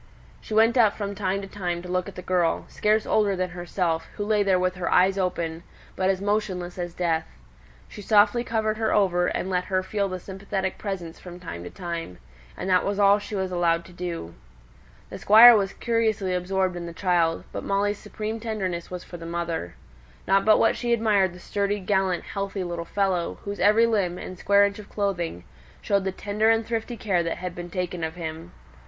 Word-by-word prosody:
She 215 - -5
went 225 +3 +4
up 215 -3 +4
from 200 -1 -3
time 195 0 -2
to - - -6
time 175 -3 -4
to - - -8
look 180 0 -1
at - - -13
the 180 - -8
girl, 175 -2 +1
scarce 215 +1 +1
older 205 -2 +2
than 185 -1 -2
herself, 175 -1 -2
who 205 - -3
lay 210 -1 +2
there 195 -2 +3
with 185 0 0
her 175 - -2
eyes 190 +2 +4
open, 170 -4 -2 0.3
but 185 0 +1
as 190 -1 +1
motionless 190 -3 -2
as 175 -1 -4
death. 165 -3 0 0.6
She 210 - -10
softly 215 +3 +4
covered 220 -2 -1
her 220 -1 0
over, 180 -3 +2
and - - -2
let 180 -1 -1
her 185 -1 0
feel 200 +1 -1
the 185 0 -4
sympathetic 190 0 -4
presence 180 -5 -5
from 180 -1 -10
time 125 - -7
to - - -6
time; 170 - -6 0.4
and - - -4
that 185 -1 +3
was 200 0 -1
all 200 0 +5
she 205 +1 -7
was 190 -1 -2
allowed 170 -1 +1
to 180 - -14
do. 170 - -5 0.8
The - - -7
Squire 230 +3 +9
was 195 -2 +1
curiously 220 -5 0
absorbed 185 0 0
in 170 -1 -5
the 170 - -7
child, 170 -3 +1
but - - -5
Molly's 205 +1 0
supreme 215 +1 -5
tenderness 195 -6 -3
was 180 -1 -6
for 175 - -9
the 165 0 -8
mother. 170 - -3 0.5
Not 195 0 +3
but 215 0 +6
what - - +3
she 240 -1 0
admired 210 -5 +2
the 180 - -12
sturdy, 200 +2 -1
gallant, 190 -2 0
healthy 195 -1 -4
little 170 -1 -4
fellow, 190 -2 -1
whose 200 -1 -5
every 215 +4 +5
limb, 200 -6 0
and 185 -1 -8
square 200 0 +5
inch 200 +1 -3
of 205 - -11
clothing, 175 - -2 0.4
showed 200 -1 0
the 190 - 0
tender 210 +3 0
and 225 0 +3
thrifty 230 +1 -3
care 195 -6 +1
that 165 -1 -2
had 180 -1 -5
been 175 0 -7
taken 180 -1 -3
of 160 +1 -3
him. 165 0 -7
190 Hz, 210 wpm, -25 LUFS, 175-205 Hz, 0.8 s, Squire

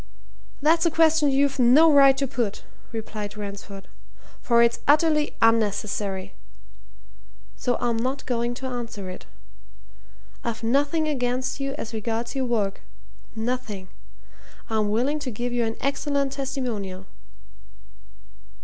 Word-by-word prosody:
"That's 330 +3 +4
a - - +4
question 320 -2 +4
you've 275 0 +2
no 275 +7 +7
right 275 -1 +7
to 275 - +1
put," 235 -5 -3 0.3
replied 215 -2 -6
Ransford, 200 -1 -8 0.5
"for 235 -1 +4
it's 235 0 +2
utterly 300 0 +3
unnecessary. 205 -3 +1 1.2
So 245 -2 -1
I'm 235 -2 0
not 260 +4 -2
going 240 -1 -1
to 265 - -7
answer 230 -7 -5
it. 185 - -11 1.2
I've 230 -1 -4
nothing 285 +6 +1
against 255 -2 -1
you 275 0 -2
as 225 -4 -6
regards 225 +2 -3
your 265 -2 -1
work 210 -5 -1 0.5
nothing! 220 -5 -3 0.8
I'm 215 -2 +1
willing 255 +8 +1
to 285 - -4
give 245 +2 -4
you 240 -1 +1
an 225 0 -3
excellent 280 0 0
testimonial." 235 -9 -4
245 Hz, 120 wpm, -25 LUFS, 220-275 Hz, 1.2 s, no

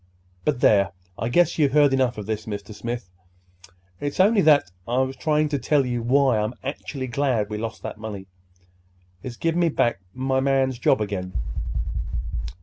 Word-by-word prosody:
But, 145 -5 0
there! 100 -2 +4 0.3
I 115 - -1
guess 175 +6 +3
you've 140 -3 +3
heard 145 -2 +5
enough 130 -3 +1
of 105 - -5
this, 110 0 -3
Mr. 100 -1 -5
Smith. 115 -4 -5 0.9
It's 145 +3 -4
only 205 +2 +5
that 145 - +4 0.2
I 120 +2 0
was 130 0 -1
trying 155 -1 +1
to 145 -2 -1
tell 140 +2 +2
you 120 -1 -2
why 130 -1 +3
I'm 105 +3 -2
actually 135 -1 -4
glad 120 -4 0
we 105 - -3
lost 115 0 -5
that - - -6
money. 105 -3 -6 1.0
It's 125 +2 -6
give 165 0 0
me 175 -1 +3
back 120 -8 +1 0.2
my 130 +1 0
man's 135 -2 +1
job 110 - +3
again." 95 -3 -3
130 Hz, 170 wpm, -24 LUFS, 110-140 Hz, 1.0 s, heard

